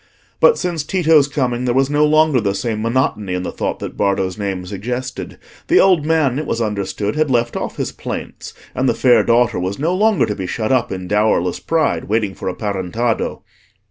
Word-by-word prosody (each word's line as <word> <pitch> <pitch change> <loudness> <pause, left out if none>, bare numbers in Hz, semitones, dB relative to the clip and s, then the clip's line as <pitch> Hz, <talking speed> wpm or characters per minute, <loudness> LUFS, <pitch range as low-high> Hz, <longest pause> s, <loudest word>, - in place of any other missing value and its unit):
But 485 - +5
since 175 -4 -2
Tito's 160 -4 +3
coming, 125 -4 -1
there 120 -1 0
was 135 0 +3
no 145 +1 +2
longer 155 -4 +3
the 100 -1 -1
same 110 +1 -2
monotony 110 -5 0
in 90 - -3
the - - -4
thought - - -3
that - - -7
Bardo's 95 -2 0
name 95 -3 -4
suggested; 125 +7 -5 0.3
the - - +5
old 180 -6 +4
man, 150 -5 +2
it 155 - -4
was 115 - -1
understood, 105 -1 -2
had 155 -1 +1
left 120 -2 +1
off - - -4
his - - -2
plaints, - - -7 0.2
and 130 0 +1
the - - +1
fair 125 -2 +4
daughter 120 -2 +2
was 95 +2 -3
no 160 +5 0
longer 210 +1 +3
to 105 - -3
be 95 -2 -5
shut 110 +5 -2
up 130 -3 +1
in 95 -1 -5
dowerless 105 -3 +1
pride, 160 -2 0
waiting 105 -2 0
for - - -4
a 90 - -5
parentado. 105 +3 -2
120 Hz, 205 wpm, -18 LUFS, 100-145 Hz, 0.3 s, But